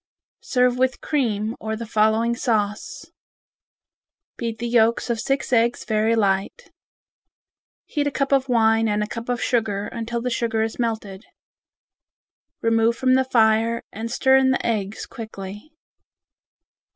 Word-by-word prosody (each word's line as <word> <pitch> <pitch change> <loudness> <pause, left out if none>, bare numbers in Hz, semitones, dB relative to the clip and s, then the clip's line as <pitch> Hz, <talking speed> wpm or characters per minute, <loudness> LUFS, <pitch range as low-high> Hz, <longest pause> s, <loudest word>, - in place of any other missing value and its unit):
Serve 250 -1 +1
with 260 0 +1
cream, 225 -6 -1
or 220 0 -3
the 230 +1 -6
following 220 +2 +2
sauce: 210 -4 -2 1.2
Beat 230 -2 -4
the 235 +1 -4
yolks 235 0 +2
of 230 - -2
six 270 +2 -1
eggs 235 0 +2
very 220 +1 +1
light. 200 - -1 1.1
Heat 290 -1 -1
a - - -1
cup 275 0 -1
of 270 -1 +2
wine 225 -1 +3
and 210 0 0
a - - -4
cup 230 +2 -7
of 245 -2 -1
sugar 210 -4 0
until 235 +1 -4
the 250 +1 -3
sugar 230 -1 0
is 225 +2 -4
melted. 220 -3 -3 1.4
Remove 230 0 +2
from 255 0 +2
the 260 0 +3
fire 230 -1 +2
and 225 +2 -6
stir 265 +2 +4
in 265 0 +3
the 260 - 0
eggs 210 -3 -2
quickly. 210 +3 -9
230 Hz, 140 wpm, -22 LUFS, 220-245 Hz, 1.4 s, stir